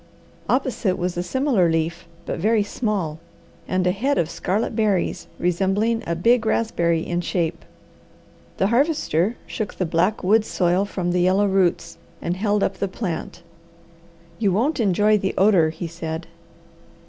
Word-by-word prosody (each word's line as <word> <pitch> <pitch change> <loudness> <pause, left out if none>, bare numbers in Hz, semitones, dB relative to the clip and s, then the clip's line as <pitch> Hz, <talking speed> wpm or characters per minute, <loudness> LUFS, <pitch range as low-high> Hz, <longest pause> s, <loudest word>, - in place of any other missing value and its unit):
Opposite 245 -7 0
was 180 0 -2
a 175 - -1
similar 225 - +1
leaf, 165 +1 -1 0.2
but - - -4
very 215 +3 +2
small, 200 -8 -2 0.5
and 185 0 0
a 180 - +3
head 265 +9 0
of 165 -1 0
scarlet 210 +5 -1
berries 210 -5 0
resembling 195 +6 +1
a 170 - 0
big 230 +7 +3
raspberry 170 -8 +1
in 175 0 -1
shape. 170 -1 -2 0.9
The 190 - +2
Harvester 240 - +1
shook 215 -3 -5
the 185 - -1
black 175 +6 0
woods 215 +4 +3
soil 180 +2 +1
from 180 -3 -2
the 180 0 +1
yellow 190 +3 +3
roots, 180 -4 0 0.2
and 175 - -2
held 205 +1 +1
up 190 - -1
the 200 - -1
plant. 175 -3 -5 1.0
"You 205 -4 +2
won't 255 - +1
enjoy 210 0 +3
the 190 0 -2
odour," 190 -5 +4
he 165 +2 -6
said. 165 0 -5
190 Hz, 150 wpm, -22 LUFS, 170-215 Hz, 1.0 s, odour